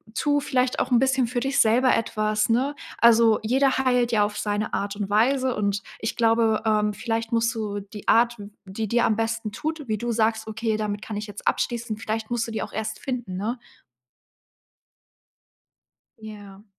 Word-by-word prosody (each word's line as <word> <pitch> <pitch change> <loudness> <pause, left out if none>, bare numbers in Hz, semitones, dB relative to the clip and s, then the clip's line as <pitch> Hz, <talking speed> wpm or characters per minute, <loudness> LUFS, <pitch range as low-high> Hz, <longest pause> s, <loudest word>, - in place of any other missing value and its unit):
tu 290 -1 +2
vielleicht 255 -3 0
auch - - -1
'n 245 - +5
bisschen 265 0 +2
für 245 +1 -2
dich 270 +2 0
selber 245 +4 +4
etwas, 215 -1 0
ne? 260 +5 +1 0.2
Also, 230 -1 +5
jeder 265 +4 +2
heilt 250 -2 +2
ja 210 -2 +4
auf 210 0 -3
seine 210 0 -2
Art 200 0 -2
und 200 -1 -4
Weise 255 +5 +2
und 200 -1 -1 0.2
ich 220 - -3
glaube, 225 -1 +2
ähm, 210 -1 +2
vielleicht 225 +1 -3
musst 230 +1 +2
du 210 -2 -3
die 205 +1 -11
Art, 235 0 +3
w 205 0 -9 0.2
die 200 +3 -4
dir 235 +1 +3
am 215 - +2
besten 225 -1 -2
tut, 310 +4 -4
wie 215 - 0
du 240 +3 -3
sagst: 220 0 0
„Okay, 220 0 -2
damit 210 -1 -3
kann 215 -1 -6
ich 210 - -4
jetzt 205 0 -10
abschließen“ 235 -3 -1
vielleicht 220 +1 -4
musst 235 -1 -1
du - - -6
die 220 - -3
auch - - -8
erst 220 0 -4
finden, 245 -8 -4
ne? 220 +6 -2 2.6
Ja. 205 -2 -11
225 Hz, 185 wpm, -24 LUFS, 215-240 Hz, 2.6 s, n